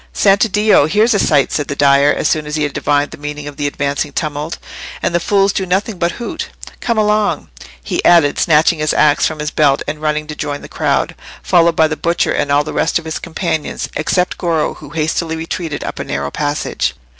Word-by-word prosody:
"Santiddio! 205 Hz, -4 st, +4 dB
here's 215 Hz, +6 st, +3 dB
a 205 Hz, -, +2 dB
sight!" 145 Hz, -3 st, +2 dB
said 145 Hz, -, -1 dB
the 140 Hz, -, -3 dB
dyer, 140 Hz, 0 st, +4 dB
as -, -, 0 dB
soon 155 Hz, -2 st, 0 dB
as 150 Hz, -, -3 dB
he 155 Hz, -, 0 dB
had 145 Hz, -, -2 dB
divined 145 Hz, 0 st, 0 dB
the -, -, -10 dB
meaning 150 Hz, 0 st, -6 dB
of 145 Hz, -, -8 dB
the 145 Hz, -1 st, -1 dB
advancing 140 Hz, 0 st, -2 dB
tumult, 150 Hz, +1 st, -3 dB, 0.4 s
"and -, -, -1 dB
the 175 Hz, -, +2 dB
fools 195 Hz, +2 st, +2 dB
do 190 Hz, -, -1 dB
nothing 190 Hz, +2 st, -1 dB
but 170 Hz, 0 st, 0 dB
hoot. 240 Hz, -, -5 dB, 0.3 s
Come 235 Hz, -2 st, -1 dB
along!" 210 Hz, 0 st, +1 dB, 0.3 s
he -, -, -2 dB
added, 165 Hz, -5 st, +4 dB
snatching 160 Hz, +1 st, +3 dB
his 155 Hz, 0 st, 0 dB
axe 150 Hz, -1 st, +4 dB
from 155 Hz, -, -5 dB
his 150 Hz, 0 st, -3 dB
belt, 145 Hz, -2 st, +2 dB
and 150 Hz, +1 st, -4 dB
running 150 Hz, 0 st, -1 dB
to 150 Hz, 0 st, -7 dB
join 145 Hz, -1 st, -4 dB
the -, -, -8 dB
crowd, -, -, 0 dB, 0.3 s
followed 165 Hz, -, +3 dB
by 160 Hz, 0 st, +4 dB
the 155 Hz, -, -3 dB
butcher 170 Hz, 0 st, 0 dB
and 145 Hz, -, 0 dB
all 145 Hz, +1 st, +3 dB
the 155 Hz, -, -6 dB
rest 165 Hz, -, +1 dB
of 170 Hz, -, -6 dB
his 160 Hz, -, -4 dB
companions, 160 Hz, -2 st, -3 dB
except 180 Hz, +4 st, 0 dB
Goro, 165 Hz, -4 st, 0 dB
who 150 Hz, -, -12 dB
hastily 160 Hz, +1 st, -1 dB
retreated 160 Hz, -1 st, -4 dB
up -, -, -5 dB
a -, -, -2 dB
narrow 70 Hz, 0 st, -3 dB
passage. 145 Hz, 0 st, -2 dB
155 Hz, 215 wpm, -16 LUFS, 145-175 Hz, 0.4 s, Santiddio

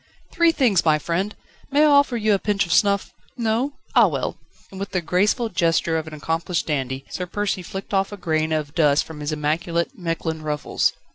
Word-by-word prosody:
"Three 335 Hz, -1 st, +4 dB
things, 245 Hz, -, +2 dB
my 155 Hz, -2 st, +4 dB
friend 180 Hz, +7 st, -2 dB, 0.3 s
may 290 Hz, +2 st, +4 dB
I -, -, +6 dB
offer 285 Hz, -4 st, +4 dB
you 215 Hz, -1 st, +2 dB
a 195 Hz, -, +2 dB
pinch 200 Hz, -1 st, 0 dB
of 170 Hz, -, -1 dB
snuff 200 Hz, 0 st, +2 dB, 0.2 s
No? 235 Hz, +4 st, 0 dB, 0.2 s
Ah -, -, +6 dB
well!..." -, -, -2 dB, 0.4 s
And 190 Hz, -, -9 dB
with 200 Hz, -, -5 dB
the 185 Hz, -, +2 dB
graceful 205 Hz, +7 st, +1 dB
gesture 165 Hz, -3 st, +1 dB
of 160 Hz, -1 st, -2 dB
an 155 Hz, -, -8 dB
accomplished 165 Hz, +2 st, -2 dB
dandy, 135 Hz, -3 st, -2 dB
Sir 180 Hz, -, -4 dB
Percy 205 Hz, 0 st, -2 dB
flicked 195 Hz, +3 st, -7 dB
off 195 Hz, +1 st, +1 dB
a 205 Hz, -, -7 dB
grain 160 Hz, -3 st, 0 dB
of 150 Hz, -2 st, -2 dB
dust 150 Hz, -3 st, +3 dB
from 160 Hz, -2 st, -10 dB
his 150 Hz, +1 st, -3 dB
immaculate 165 Hz, -, -1 dB
Mechlin 165 Hz, -4 st, -3 dB
ruffles. 150 Hz, -1 st, 0 dB
175 Hz, 200 wpm, -22 LUFS, 155-205 Hz, 0.4 s, I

